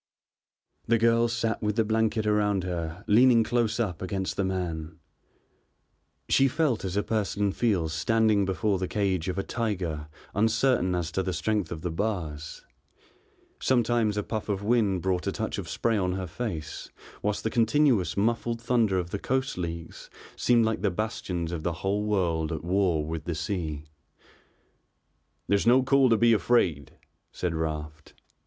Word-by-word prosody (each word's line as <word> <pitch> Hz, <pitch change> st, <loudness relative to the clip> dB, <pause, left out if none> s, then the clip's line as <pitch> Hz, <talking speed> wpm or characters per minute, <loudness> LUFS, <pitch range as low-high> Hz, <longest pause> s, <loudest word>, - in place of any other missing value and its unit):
The 115 Hz, -, +4 dB
girl 115 Hz, +1 st, +3 dB
sat 115 Hz, -1 st, -1 dB
with 105 Hz, -1 st, -1 dB
the 115 Hz, -, +3 dB
blanket 110 Hz, 0 st, +1 dB
around 105 Hz, -2 st, +1 dB
her 85 Hz, -2 st, -4 dB
leaning 115 Hz, +2 st, +5 dB
close 115 Hz, 0 st, 0 dB
up 95 Hz, -8 st, -2 dB
against 95 Hz, 0 st, -3 dB
the 100 Hz, -, 0 dB
man. 85 Hz, -4 st, -3 dB, 1.3 s
She 135 Hz, -, +4 dB
felt 135 Hz, -4 st, 0 dB
as 95 Hz, 0 st, -3 dB
a 105 Hz, -, +2 dB
person 105 Hz, -2 st, 0 dB
feels 95 Hz, -9 st, 0 dB
standing 110 Hz, +4 st, +2 dB
before 95 Hz, +1 st, 0 dB
the 95 Hz, -, -2 dB
cage 95 Hz, -4 st, -1 dB
of 90 Hz, -, -3 dB
a 95 Hz, -, 0 dB
tiger 90 Hz, -10 st, -3 dB, 0.3 s
uncertain 110 Hz, -3 st, +2 dB
as 85 Hz, -2 st, -2 dB
to 95 Hz, -, 0 dB
the 95 Hz, -1 st, -2 dB
strength 105 Hz, -5 st, -1 dB
of 80 Hz, -, -5 dB
the 90 Hz, -, -2 dB
bars, 80 Hz, -6 st, -4 dB, 0.9 s
sometimes 120 Hz, -4 st, +2 dB
a 105 Hz, -, 0 dB
puff 110 Hz, 0 st, -4 dB
of 100 Hz, -1 st, -1 dB
wind 105 Hz, -5 st, +2 dB
brought 95 Hz, -2 st, 0 dB
a -, -, +1 dB
touch -, -, -3 dB
of -, -, -6 dB
spray 115 Hz, -2 st, 0 dB
on 90 Hz, -1 st, 0 dB
her 95 Hz, 0 st, -3 dB
face, 90 Hz, -3 st, -5 dB, 0.3 s
whilst 105 Hz, 0 st, -1 dB
the 110 Hz, -, -1 dB
continuous 115 Hz, -, +2 dB
muffled 115 Hz, +2 st, 0 dB
thunder 115 Hz, -5 st, +1 dB
of 90 Hz, -1 st, -3 dB
the 100 Hz, -, -3 dB
coast 130 Hz, +4 st, -1 dB
leagues 85 Hz, -2 st, -6 dB, 0.3 s
seemed 120 Hz, -2 st, +3 dB
like 110 Hz, 0 st, -1 dB
the -, -, +2 dB
bastions 90 Hz, -4 st, -3 dB
of 85 Hz, -2 st, -3 dB
the 85 Hz, +2 st, -1 dB
whole 100 Hz, +2 st, +1 dB
world 85 Hz, -6 st, 0 dB
at 80 Hz, -2 st, -4 dB
war 90 Hz, -4 st, +1 dB
with 80 Hz, -1 st, -5 dB
the 85 Hz, -, -2 dB
sea. 80 Hz, -3 st, -3 dB, 1.6 s
"There's 100 Hz, +2 st, +2 dB
no 125 Hz, +2 st, +6 dB
call 135 Hz, 0 st, +4 dB
to 115 Hz, -, +4 dB
be 115 Hz, +1 st, +5 dB
afraid," 85 Hz, -, +1 dB, 0.4 s
said 90 Hz, -2 st, -2 dB
Raft. 75 Hz, -1 st, -5 dB
100 Hz, 165 wpm, -27 LUFS, 85-115 Hz, 1.6 s, no